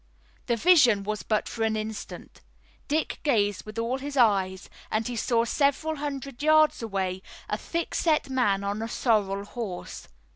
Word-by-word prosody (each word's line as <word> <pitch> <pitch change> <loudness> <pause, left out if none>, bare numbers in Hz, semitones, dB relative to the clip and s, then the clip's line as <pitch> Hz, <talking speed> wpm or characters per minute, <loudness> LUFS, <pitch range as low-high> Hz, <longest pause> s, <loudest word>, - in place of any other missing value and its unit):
The 235 - +2
vision 250 - +5
was 210 +1 -3
but 215 -1 -1
for 230 - -6
an 220 -1 +1
instant. 215 0 -6 0.5
Dick 310 +2 -1
gazed 205 - +1
with 215 - -9
all 235 +3 -1
his 285 +1 -5
eyes, 195 -6 +2 0.2
and 215 +1 -1
he 245 - -4
saw 230 0 +1
several 290 +5 +1
hundred 275 -3 -5
yards 310 -1 +4
away 190 -4 -2 0.3
a - - -1
thickset 330 -2 0
man 240 -7 +1
on 200 +2 -2
a 225 - -2
sorrel 200 -5 0
horse. 210 -5 -6
230 Hz, 155 wpm, -27 LUFS, 205-280 Hz, 0.5 s, vision